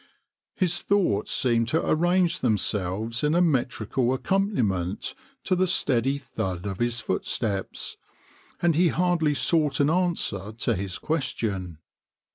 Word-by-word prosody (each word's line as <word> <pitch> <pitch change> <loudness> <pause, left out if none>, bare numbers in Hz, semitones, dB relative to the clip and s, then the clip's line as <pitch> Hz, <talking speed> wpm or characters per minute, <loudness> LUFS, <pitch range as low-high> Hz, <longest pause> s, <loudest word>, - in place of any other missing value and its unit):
" - - -67
His 175 -3 +1
thoughts 185 - +1
seemed 115 -2 +2
to 160 +7 0
arrange 175 +2 +2
themselves 110 0 0
in 150 +2 +2
a - - +4
metrical 130 - +1
accompaniment 125 - -1 0.3
to 185 - +1
the 185 +1 +2
steady 135 -5 +2
thud 95 -9 -4
of 95 -2 -4
his 120 0 +1
footsteps, 100 -5 -2 0.7
and 170 -1 +4
he 175 +3 +3
hardly 170 -3 +1
sought 150 -3 +1
an 145 +1 +3
answer 165 - 0
to 115 - -1
his 95 0 -4
question. 105 - -2
130 Hz, 130 wpm, -25 LUFS, 105-170 Hz, 0.7 s, a